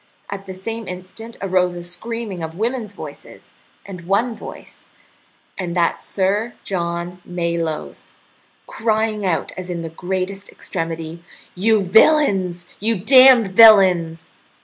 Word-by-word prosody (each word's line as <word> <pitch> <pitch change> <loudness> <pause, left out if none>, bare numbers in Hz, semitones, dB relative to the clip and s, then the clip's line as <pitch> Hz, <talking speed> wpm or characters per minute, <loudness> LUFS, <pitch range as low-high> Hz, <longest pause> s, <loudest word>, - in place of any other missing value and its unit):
At 195 0 -7
the 190 - -6
same 225 +3 -6
instant 185 +6 -8
arose 180 -2 +1
a 175 - -7
screaming 200 +2 -5
of 160 +1 -6
women's 230 0 -2
voices, - - -11 0.3
and 180 -3 -10
one 225 +5 +1
voice, - - -11 0.7
and 175 -2 -3
that 170 -1 +1
Sir 205 +5 -1
John 175 -1 -4
Malyoe's, 170 -3 -4 0.5
crying 220 -2 -1
out 170 - -1
as 185 -1 -7
in 175 -1 -4
the 165 - -5
greatest 190 +3 -4
extremity: 165 -1 -5 0.3
"You 210 +2 +2
villains! 190 - +3
You 225 +3 +1
damned 255 +1 +7
villains!" 185 -6 +6
185 Hz, 125 wpm, -20 LUFS, 175-220 Hz, 0.7 s, damned